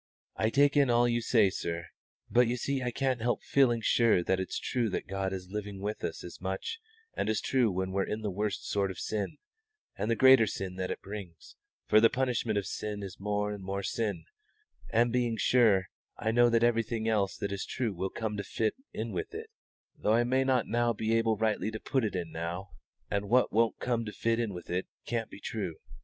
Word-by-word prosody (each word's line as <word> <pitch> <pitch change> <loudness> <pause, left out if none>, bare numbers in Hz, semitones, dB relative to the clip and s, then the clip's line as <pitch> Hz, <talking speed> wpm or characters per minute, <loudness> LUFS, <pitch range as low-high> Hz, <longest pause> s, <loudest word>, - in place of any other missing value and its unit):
"I 110 - +1
take 140 +4 +4
in 140 -3 +4
all 120 0 +4
that 120 - +3
you 120 0 +1
say, 110 -4 +4
sir; 85 -2 -3 0.4
but 120 0 +4
you 120 +1 -1
see 135 +2 -1
I 125 - -1
can't 130 0 -1
help 120 +1 0
feeling 120 -4 +3
sure 110 -5 +3
that 95 +2 +1
it's 95 - -3
true 120 -3 -1
that 95 - -3
God 95 0 -2
is 95 -1 -6
living 105 -1 -5
with 105 +2 -4
us 80 - -4
as 90 - -10
much 95 - -3 0.4
and - - -1
as 110 - +1
true 125 -4 +2
when 95 0 -2
we're 95 0 0
in 105 +1 -3
the 105 - -1
worst 105 +1 -2
sort 100 -1 +1
of 95 - -6
sin, 105 +1 -3 0.6
and 105 - -2
the 115 - +3
greater 130 -2 +7
sin 95 -2 -4
that 95 -1 -2
it - - -5
brings 100 -5 -9 0.3
for 110 - +5
the 115 - +7
punishment 125 -4 0
of 100 - -1
sin 105 -1 -4
is 95 -2 -8
more 105 +1 -1
and 100 -2 -8
more 100 +1 -3
sin 100 -9 -2 0.7
and 120 +1 +3
being 120 -2 +1
sure, 105 -5 +4 0.3
I 110 - 0
know 120 +1 +5
that 115 0 +3
everything 115 -1 +1
else 105 -3 +1
that 100 -2 -3
is 100 -1 -3
true 120 -5 -2
will 95 +1 -2
come 110 -1 -3
to 100 - -2
fit 110 +3 -1 0.2
in - - -3
with - - -4
it, 445 +1 -7 0.5
though 105 - +2
I 120 +1 +4
may 130 +2 +2
not 130 -3 +2 0.3
be 110 +1 0
able 115 -1 +2
rightly 110 0 0
to 110 0 -5
put 130 +2 0
it 105 -3 -1
in 85 -3 -3
now, 85 +3 -5 0.4
and 100 0 -1
what 125 +2 +3
won't 115 0 +3
come 120 -2 -1
to 105 - -5
fit 115 +2 0
in 115 -3 -1
with 90 -2 -8
it 90 +1 -1 0.2
can't 115 -2 -2
be - - -11
true." 100 -5 -4
110 Hz, 225 wpm, -30 LUFS, 95-120 Hz, 0.7 s, greater